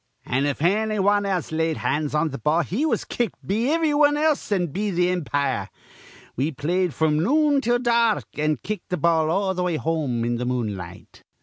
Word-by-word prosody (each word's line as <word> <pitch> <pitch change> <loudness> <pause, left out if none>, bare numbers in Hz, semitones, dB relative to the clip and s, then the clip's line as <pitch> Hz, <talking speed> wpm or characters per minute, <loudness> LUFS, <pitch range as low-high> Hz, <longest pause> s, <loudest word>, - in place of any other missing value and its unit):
An', 135 +3 0
if 145 +1 -2
anny 215 +4 +1
wan 205 +1 +2 0.2
laid 160 0 0
hands 150 0 -1
on 155 +1 +1
th' 140 - -7
ball, 155 +3 +3
he 255 - -1
was - - -1
kicked 235 -6 -3
be 225 +8 0
ivry 320 -2 +2
wan 290 0 +4
else 305 -6 0
an' 185 -3 +2
be 205 +6 -2
th' 180 -1 +1
impire. 145 -5 -1 0.7
We 140 +6 0
played 175 +6 0
fr'm 155 -1 +2
noon 290 - +3
till 240 0 +2
dark, 235 -2 +2
an' 155 0 0
kicked 210 -4 -5
th' 180 - -2
ball 160 -2 +2
all 190 +2 +1
th' 180 - -3
way 180 -2 0
home 150 -7 -1
in 120 0 -1
the 125 - -3
moonlight. 105 -9 -5
175 Hz, 195 wpm, -23 LUFS, 150-220 Hz, 0.7 s, wan